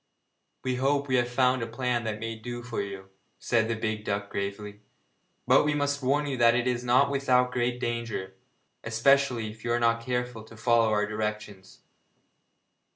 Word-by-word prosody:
'We 130 Hz, -1 st, -1 dB
hope 140 Hz, +2 st, +1 dB
we 130 Hz, -1 st, +2 dB
have 120 Hz, 0 st, +1 dB
found 125 Hz, 0 st, +2 dB
a 115 Hz, -, -2 dB
plan 120 Hz, 0 st, -2 dB
that 105 Hz, -1 st, -3 dB
may 115 Hz, 0 st, -4 dB
do 120 Hz, +2 st, -7 dB
for 120 Hz, -1 st, -3 dB
you,' 100 Hz, -1 st, -7 dB, 0.3 s
said 115 Hz, -2 st, +1 dB
the 115 Hz, -, -1 dB
big 110 Hz, -1 st, -3 dB
duck 100 Hz, -1 st, -3 dB
gravely, 100 Hz, +1 st, -5 dB, 0.7 s
'but -, -, +5 dB
we 150 Hz, 0 st, +1 dB
must 145 Hz, 0 st, 0 dB
warn 140 Hz, +3 st, +1 dB
you 140 Hz, -2 st, -3 dB
that 120 Hz, -1 st, +5 dB
it 125 Hz, 0 st, +1 dB
is 125 Hz, -1 st, -1 dB
not 125 Hz, +3 st, +3 dB
without 125 Hz, -2 st, +2 dB
great 125 Hz, 0 st, -1 dB
danger, 115 Hz, -6 st, -3 dB, 0.5 s
especially 120 Hz, 0 st, +2 dB
if 110 Hz, 0 st, -15 dB
you 120 Hz, -, -1 dB
are 120 Hz, -, +2 dB
not 115 Hz, 0 st, +2 dB
careful 125 Hz, -2 st, -3 dB
to 110 Hz, 0 st, -14 dB
follow 115 Hz, 0 st, +3 dB
our 105 Hz, -1 st, +2 dB
directions.' 105 Hz, -2 st, -5 dB
120 Hz, 180 wpm, -27 LUFS, 110-125 Hz, 0.7 s, but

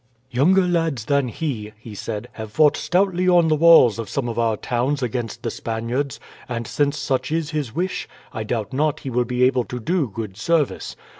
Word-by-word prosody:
"Younger 175 Hz, +10 st, +4 dB
lads 165 Hz, -10 st, 0 dB
than 140 Hz, -1 st, +2 dB
he," 115 Hz, -4 st, -4 dB
he 110 Hz, 0 st, -11 dB
said, 105 Hz, +1 st, -5 dB
"have 110 Hz, -1 st, -8 dB
fought 150 Hz, +3 st, +4 dB
stoutly 185 Hz, 0 st, +1 dB
on 175 Hz, -2 st, +5 dB
the 155 Hz, -, +4 dB
walls 150 Hz, -9 st, +6 dB
of 110 Hz, -4 st, -4 dB
some 135 Hz, -3 st, -2 dB
of 120 Hz, 0 st, -3 dB
our 115 Hz, -2 st, +1 dB
towns 130 Hz, +5 st, -1 dB
against 120 Hz, -1 st, -3 dB
the 115 Hz, -, -2 dB
Spaniards; 120 Hz, +6 st, -3 dB, 0.3 s
and 120 Hz, -1 st, -3 dB
since 145 Hz, +5 st, 0 dB
such 140 Hz, 0 st, -1 dB
is 165 Hz, -1 st, -1 dB
his 145 Hz, -6 st, -3 dB
wish, 185 Hz, +3 st, -2 dB, 0.3 s
I 110 Hz, -, -3 dB
doubt 110 Hz, -1 st, -3 dB
not 150 Hz, +2 st, 0 dB
he 135 Hz, -, -5 dB
will 125 Hz, 0 st, +1 dB
be 125 Hz, +1 st, 0 dB
able 130 Hz, -1 st, +3 dB
to 125 Hz, -, -6 dB
do 160 Hz, +5 st, 0 dB
good 105 Hz, -2 st, -6 dB
service. 160 Hz, +4 st, 0 dB
130 Hz, 200 wpm, -22 LUFS, 115-155 Hz, 0.3 s, walls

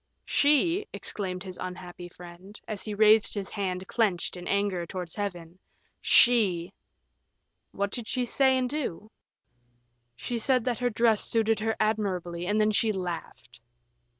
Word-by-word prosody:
"She," 330 Hz, +8 st, +2 dB
exclaimed 185 Hz, -3 st, -4 dB
his 185 Hz, -2 st, -8 dB
unhappy 180 Hz, -1 st, -7 dB
friend, 180 Hz, +4 st, -13 dB
as 210 Hz, -3 st, -4 dB
he 210 Hz, -2 st, -5 dB
raised 215 Hz, +1 st, +5 dB
his 200 Hz, -2 st, -4 dB
hand 185 Hz, -2 st, -3 dB
clenched 200 Hz, -8 st, 0 dB
in 180 Hz, 0 st, -8 dB
anger, 200 Hz, -3 st, 0 dB
towards 180 Hz, -1 st, -6 dB
Heaven. 180 Hz, -4 st, -5 dB, 0.4 s
"She! 195 Hz, -7 st, +4 dB, 0.5 s
" -, -, -50 dB
"What 200 Hz, 0 st, 0 dB
did 235 Hz, -2 st, -5 dB
she 250 Hz, -1 st, -1 dB
say 265 Hz, +2 st, +3 dB
and 255 Hz, -1 st, 0 dB
do?" 245 Hz, -, -4 dB, 1.0 s
"She 235 Hz, -, -4 dB
said 255 Hz, 0 st, +2 dB
that 245 Hz, -3 st, -1 dB
her 245 Hz, 0 st, +1 dB
dress 225 Hz, -1 st, +2 dB
suited 225 Hz, -2 st, +1 dB
her 220 Hz, +1 st, -1 dB
admirably, 185 Hz, -5 st, -1 dB
and 210 Hz, +2 st, +1 dB
then 215 Hz, 0 st, +3 dB
she 215 Hz, +1 st, +2 dB
laughed." 175 Hz, -, -6 dB
205 Hz, 150 wpm, -27 LUFS, 180-225 Hz, 1.0 s, raised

